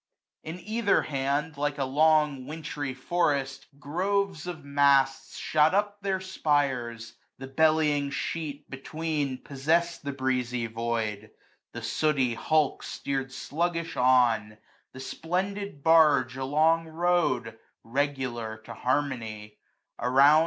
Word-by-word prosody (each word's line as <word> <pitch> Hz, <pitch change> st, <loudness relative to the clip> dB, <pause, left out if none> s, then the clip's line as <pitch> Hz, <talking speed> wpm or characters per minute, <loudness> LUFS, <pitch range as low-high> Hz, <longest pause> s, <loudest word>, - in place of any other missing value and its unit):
On 165 Hz, +3 st, -5 dB
either 215 Hz, +2 st, +1 dB
hand> 140 Hz, +2 st, -2 dB
Like 145 Hz, 0 st, -1 dB
a 140 Hz, -, 0 dB
long 150 Hz, -1 st, +2 dB
wintry 145 Hz, -3 st, -5 dB
forest, 140 Hz, -2 st, -1 dB
groves 180 Hz, +4 st, -1 dB
of 160 Hz, -5 st, -6 dB
masts 140 Hz, -1 st, +2 dB
Shot 155 Hz, +3 st, +2 dB
up 205 Hz, 0 st, 0 dB
their 195 Hz, -1 st, -1 dB
spires; 135 Hz, -10 st, -1 dB, 0.2 s
the 135 Hz, -, -7 dB
bellying 150 Hz, 0 st, +2 dB
sheet 145 Hz, 0 st, -4 dB
between 145 Hz, 0 st, -3 dB
i^^ -, -, -28 dB
Possessed 165 Hz, +5 st, 0 dB
the 140 Hz, -, -3 dB
breezy 125 Hz, -3 st, -1 dB
void; 115 Hz, -2 st, -3 dB, 0.4 s
the -, -, -7 dB
sooty 140 Hz, -6 st, +1 dB
hulk 155 Hz, +4 st, +1 dB
Steer'd 135 Hz, -1 st, -3 dB
fluggilh 165 Hz, +4 st, -2 dB
on; 125 Hz, -5 st, +3 dB, 0.3 s
the 130 Hz, -, -11 dB
splendid 185 Hz, +3 st, -3 dB
barge 150 Hz, -6 st, +5 dB
along 155 Hz, +5 st, +2 dB
^ow'd, 160 Hz, -9 st, 0 dB, 0.2 s
regular, 125 Hz, -4 st, -2 dB
to 115 Hz, -, -8 dB
harmony; 115 Hz, -5 st, -2 dB, 0.4 s
around. 135 Hz, +5 st, +6 dB
145 Hz, 115 wpm, -27 LUFS, 130-160 Hz, 0.4 s, around